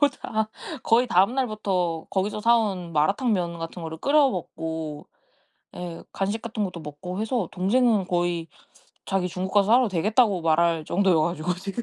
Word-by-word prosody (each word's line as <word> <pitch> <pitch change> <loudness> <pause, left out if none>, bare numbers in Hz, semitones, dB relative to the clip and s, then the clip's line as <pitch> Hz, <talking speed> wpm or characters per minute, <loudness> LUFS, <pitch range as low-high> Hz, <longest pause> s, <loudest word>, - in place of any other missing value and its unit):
뭐 290 - +6
다 220 -5 -3 0.3
거의 240 +2 +3
다음날부터 195 -6 +1
거기서 200 +2 -1
사온 210 -7 +1
마라탕면 175 - +1
같은 165 +1 -6
거를 160 0 -6
끓여 280 - +4
먹고 160 -4 -5 0.7
예 175 -2 -7
간식 205 +3 -2
같은 220 -2 -3
것도 180 -3 -4
먹고 180 +6 -6
해서 220 -5 -1
동생은 205 +1 +2
거의 175 -2 -1 0.6
자기 190 -2 -1
중국 185 +2 -4
가서 200 -1 +5
살아도 240 +1 +5
되겠다고 205 +2 +2
말할 165 0 +2
정도여 180 -1 +2
가지고 170 +1 -1
지금. 195 +5 -5
190 Hz, 330 characters per minute, -25 LUFS, 170-220 Hz, 0.7 s, 뭐